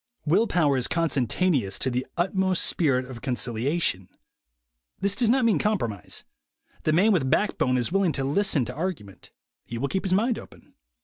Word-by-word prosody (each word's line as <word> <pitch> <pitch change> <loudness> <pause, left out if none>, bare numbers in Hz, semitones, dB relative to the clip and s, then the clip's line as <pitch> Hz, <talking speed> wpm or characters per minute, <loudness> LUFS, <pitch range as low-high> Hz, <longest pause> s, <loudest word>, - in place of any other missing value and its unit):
Will 190 +9 +3
power 150 -8 +2
is 125 - 0
consentaneous 140 - +1
to 130 - -1
the 125 +1 -2
utmost 185 0 +1
spirit 135 -6 +1
of 125 -2 -10
concilia 125 +3 -1
tion. 95 - 0 0.9
This 200 0 +1
does 235 0 +2
not 255 0 +3
mean 225 - +3
compromise. 120 - -2 0.6
The 155 - +3
man 190 +8 +4
with 150 -10 +1
backbone 130 -8 +1
is 125 +5 -1
willing 195 -4 +2
to 135 - -2
listen 145 -1 +1
to 125 - -6
argument; 150 - -6 0.3
he 120 - -7
will 140 +4 -2
keep 190 - -2
his 185 - +1
mind 225 +5 +1
open. - - -16
155 Hz, 175 wpm, -25 LUFS, 125-190 Hz, 0.9 s, man